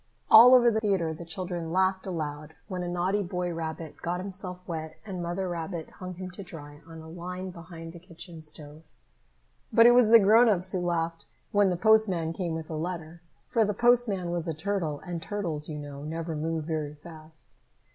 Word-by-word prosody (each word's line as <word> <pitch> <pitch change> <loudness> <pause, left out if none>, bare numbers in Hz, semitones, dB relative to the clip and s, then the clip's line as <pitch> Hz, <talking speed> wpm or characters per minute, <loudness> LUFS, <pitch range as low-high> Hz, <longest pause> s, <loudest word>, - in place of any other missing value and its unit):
All 240 +3 +10
over 240 -1 +6
the 220 - +1
theatre 190 -7 0
the 170 +2 -9
children 175 -1 -4
laughed 190 +1 +1
aloud 155 -3 -5
when 185 -2 -4
a 175 - -3
naughty 180 +4 0
boy 180 -1 -3
rabbit 160 -1 -6
got 175 +1 -2
himself 185 -1 -5
wet 160 -2 -5
and 190 -4 -5
Mother 175 +2 -2
Rabbit 170 -1 -5
hung 185 -1 -8
him 185 +1 -7
to 180 - -9
dry 145 -4 -10
on 165 -1 -10
a 160 - -11
line 180 +3 -6
behind 165 -1 -10
the 170 - -10
kitchen 170 -1 -10
stove. 150 0 -9 0.8
But 230 +1 +6
it 240 - +9
was 240 -2 +5
the 230 - +10
grown 225 +3 +6
ups 185 -2 +1
who 185 - -1
laughed 165 -1 -2 0.2
when 205 -1 +4
the 180 - -1
postman 190 -5 +3
came 170 -2 -3
with 160 0 -6
a - - -3
letter, 165 0 -5 0.3
for 230 - +2
the 210 -1 -1
postman 235 -7 +2
was 175 -1 -2
a 165 - -2
turtle, 165 -4 -2
and 175 -2 -4
turtles, 165 -6 -3
you 150 - -4
know, 145 -1 -8
never 165 +1 -4
move 160 +1 -2
very 150 -2 -3
fast. 155 0 -12
175 Hz, 195 wpm, -28 LUFS, 160-190 Hz, 0.8 s, All